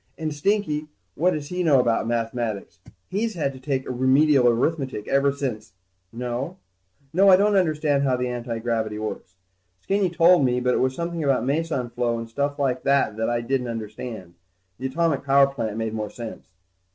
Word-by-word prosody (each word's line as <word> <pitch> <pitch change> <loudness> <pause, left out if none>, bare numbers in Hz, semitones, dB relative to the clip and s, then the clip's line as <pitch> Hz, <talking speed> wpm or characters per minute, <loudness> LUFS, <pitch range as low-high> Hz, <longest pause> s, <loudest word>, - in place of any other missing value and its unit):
And 155 -2 -3
Stinky, 155 -2 0 0.3
what 175 +3 +2
does 145 -1 -5
he 180 0 -2
know 150 -6 +4
about 115 -2 +1
mathematics? 115 -2 -3 0.3
He's 220 +2 -2
had 145 -5 -1
to 130 - -11
take 130 0 -2
Remedial 130 +1 +4
Arithmetic 130 -1 0
ever 140 0 +3
since... 125 -8 -5 0.4
No, 125 +8 -4 0.6
I 195 0 +7
don't 205 +2 +3
understand 155 -6 +2
how 130 -2 +1
the 125 0 -1
antigravity 115 -3 -2
works. 105 -3 -6 0.4
Skinny 195 - 0
told 170 -1 +5
me, 125 -1 +2
but 125 0 +1
it - - +1
was 130 0 +1
something 170 0 -3
about 135 -3 +1
meson 140 -4 -1
flow 120 -1 -1
and 115 0 -5
stuff 140 +5 -2
like 130 -3 0
that 140 -6 +2
that 110 +1 0
I 120 0 0
didn't 125 +1 -1
understand. 110 -4 -6 0.5
The 130 - -2
atomic 160 +1 0
power 140 0 +5
plant 115 -6 -4
made 115 -1 -2
more 105 -1 -3
sense. 115 0 -8
130 Hz, 175 wpm, -24 LUFS, 120-155 Hz, 0.6 s, I